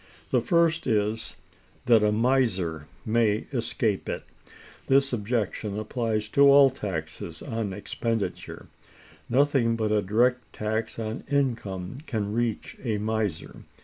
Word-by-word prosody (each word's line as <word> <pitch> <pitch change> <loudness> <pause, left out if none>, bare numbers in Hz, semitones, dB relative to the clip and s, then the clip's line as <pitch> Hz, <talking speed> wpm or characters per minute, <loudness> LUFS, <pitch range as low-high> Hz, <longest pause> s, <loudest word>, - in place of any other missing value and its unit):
The - - +3
first 170 -4 +2
is, 110 -1 0 0.5
that 115 -3 +6
a 105 0 +3
miser 105 - +1 0.2
may 110 -1 +2
escape 115 -4 -1
it. - - -3 0.6
This 135 0 +3
objection 105 -2 -2
applies 110 -1 -2
to 140 - +2
all 140 -1 +7
taxes 95 -10 -6
on 110 -3 -3
expenditure; 110 +2 -4 0.6
nothing 130 -3 +3
but 110 -2 -1
a 105 -1 +3
direct 120 +6 +1
tax 110 +1 -3
on 110 +2 -4
income 120 -7 -1
can 105 -3 -2
reach 115 -2 -2
a 110 -5 0
miser. 105 -4 -2
110 Hz, 120 wpm, -26 LUFS, 105-125 Hz, 0.6 s, all